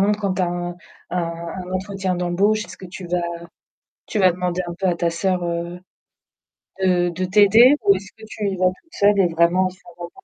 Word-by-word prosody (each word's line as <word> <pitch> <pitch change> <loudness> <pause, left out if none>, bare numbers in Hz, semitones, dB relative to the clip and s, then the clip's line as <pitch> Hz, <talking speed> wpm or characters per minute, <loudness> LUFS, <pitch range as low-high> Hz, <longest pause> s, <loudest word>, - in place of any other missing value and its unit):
exemple, 205 +1 +2
quand 195 -2 -1
tu 185 - 0
as - - +2
un 175 0 -4 0.3
un 180 - -1
un 170 +2 -7
entretien 190 0 -2
d'embauche, 195 +5 +1
est-ce - - -11
que 190 - -10
tu 180 0 -9
vas 175 0 0 0.9
tu 215 - -3
vas 185 -2 +5
demander 180 0 -2
un 170 - -5
peu 190 - -1
à 180 - +2
ta 170 0 0
soeur, 180 +1 -1
heu, 170 +1 -4 1.0
de 180 -1 +2
de 185 +2 -3
t'aider 210 +7 +6
ou 200 -1 +6
est-ce 195 +1 -7
que 220 - -15
tu 215 -1 -4
y 195 - -3
vas 185 0 +3
toute 325 - -6
seule 205 0 +3
et 190 - +5
vraiment, 170 +3 +2
il - - -17
faut 185 - -18
vraiment 175 0 -8
185 Hz, 225 wpm, -21 LUFS, 175-195 Hz, 1.0 s, t'aider